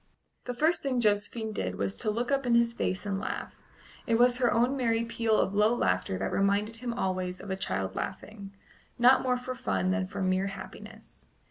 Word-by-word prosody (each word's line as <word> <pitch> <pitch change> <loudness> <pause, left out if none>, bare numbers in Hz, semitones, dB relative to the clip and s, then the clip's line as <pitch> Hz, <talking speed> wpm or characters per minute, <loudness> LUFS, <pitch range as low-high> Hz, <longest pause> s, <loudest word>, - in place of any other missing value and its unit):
The 245 - -4
first 315 +7 +2
thing 265 -3 0
Josephine 215 0 0
did 95 - -3
was 100 0 -2
to - - -1
look 240 +5 -1
up 275 -2 +1
in 235 - +4
his 235 0 +3
face 185 -4 -2
and 195 -1 -2
laugh; - - -4 0.5
it 230 - +3
was 245 +1 +5
her 245 -2 +3
own 245 +4 +2
merry 230 -3 +1
peal 230 -1 +1
of 195 - +1
low 210 +3 +3
laughter 90 - 0
that - - -2
reminded 200 +3 +1
him 245 +1 -4
always 185 -4 -2
of 200 - -7
a - - 0
child 95 - -3
laughing, 200 -2 -6 0.5
not 250 +2 +6
more 250 -1 +1
for 250 +1 -5
fun 95 - -1
than 95 0 0
for 190 - -4
mere 185 +1 +1
happiness. 195 - -10
215 Hz, 205 wpm, -29 LUFS, 185-240 Hz, 0.5 s, not